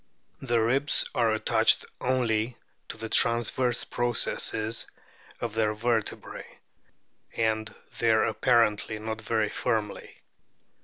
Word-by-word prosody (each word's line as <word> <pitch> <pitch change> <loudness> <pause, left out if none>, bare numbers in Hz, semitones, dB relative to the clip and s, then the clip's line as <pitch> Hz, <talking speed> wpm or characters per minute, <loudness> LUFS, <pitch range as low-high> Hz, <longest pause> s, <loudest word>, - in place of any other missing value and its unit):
The 120 -3 +1
ribs 135 +6 +2
are 115 -2 +2
attached 110 - +2
only 120 -2 0 0.3
to - - -6
the 110 0 -5
transverse 120 +2 +2
processes 115 -1 0 0.5
of 115 -3 -4
their 110 -1 0
vertebrae, 115 -1 -3 0.8
and 110 -1 0 0.3
there 110 -1 +3
apparently 110 -2 +1
not 110 +1 -5
very 110 -1 0
firmly. 110 -4 -3
115 Hz, 100 wpm, -27 LUFS, 110-120 Hz, 0.8 s, there